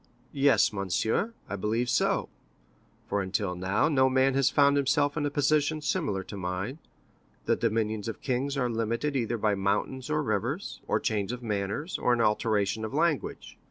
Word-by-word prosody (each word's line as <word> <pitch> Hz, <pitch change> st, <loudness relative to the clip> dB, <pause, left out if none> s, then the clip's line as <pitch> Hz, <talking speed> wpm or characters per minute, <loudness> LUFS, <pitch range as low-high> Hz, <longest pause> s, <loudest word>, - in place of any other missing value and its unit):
"Yes, 135 Hz, -7 st, +4 dB
monsieur, 110 Hz, -, -1 dB
I -, -, -4 dB
believe 110 Hz, +5 st, -1 dB
so; -, -, +1 dB, 0.8 s
for 100 Hz, -, 0 dB
until 95 Hz, 0 st, -1 dB
now, 95 Hz, +7 st, +1 dB
no 130 Hz, -4 st, +3 dB
man 130 Hz, +1 st, +3 dB
has 135 Hz, -1 st, +3 dB
found 140 Hz, 0 st, +4 dB
himself 145 Hz, +1 st, +2 dB
in 150 Hz, -2 st, 0 dB
a -, -, -1 dB
position 145 Hz, +2 st, +1 dB
similar 105 Hz, -9 st, -1 dB
to 100 Hz, -, -9 dB
mine. 95 Hz, -, -4 dB, 0.7 s
The -, -, +3 dB
dominions 110 Hz, -2 st, -1 dB
of 115 Hz, -, -5 dB
kings 135 Hz, +2 st, -1 dB
are 125 Hz, -3 st, +1 dB
limited 115 Hz, +5 st, -1 dB
either 120 Hz, -2 st, 0 dB
by 105 Hz, -1 st, +1 dB
mountains 100 Hz, +7 st, -1 dB
or 150 Hz, 0 st, +1 dB
rivers, 120 Hz, -, -2 dB
or -, -, +2 dB
a -, -, -5 dB
change 105 Hz, -2 st, 0 dB
of 125 Hz, 0 st, -6 dB
manners, 105 Hz, -, -2 dB
or 125 Hz, -, +2 dB
an 120 Hz, -, 0 dB
alteration 105 Hz, -1 st, +1 dB
of 110 Hz, +5 st, -4 dB
language. 160 Hz, -2 st, -1 dB
120 Hz, 175 wpm, -28 LUFS, 105-140 Hz, 0.8 s, Yes